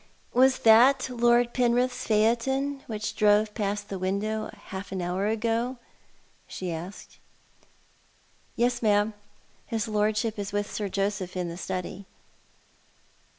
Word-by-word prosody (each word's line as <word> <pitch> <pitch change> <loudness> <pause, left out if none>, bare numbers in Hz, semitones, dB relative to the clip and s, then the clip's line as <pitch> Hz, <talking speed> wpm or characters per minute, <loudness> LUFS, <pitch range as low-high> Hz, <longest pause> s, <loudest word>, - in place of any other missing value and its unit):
"Was 260 +2 +5
that 255 +4 +6
Lord 240 0 +3
Penrith's 245 0 +1
phaeton 255 +6 +1
which 210 -1 -4
drove 210 0 +3
past 205 -1 -2
the 195 -2 -5
window 210 +4 -2
half 190 0 -7
an 190 - -3
hour 180 +3 -1
ago? 230 +3 -1 0.3
" - - -34 0.3
she 185 -2 -5
asked. 175 +5 -9 0.7
" - - -36
Yes, 240 0 +1
ma'am. 210 -1 +2 0.5
His 225 -2 -2
Lordship 215 +1 0
is 200 0 -4
with 205 0 -2
Sir 205 -2 -3
Joseph 195 -2 -2
in 180 -1 -2
the 170 - -6
study." 190 +1 -5
215 Hz, 130 wpm, -27 LUFS, 200-235 Hz, 0.7 s, that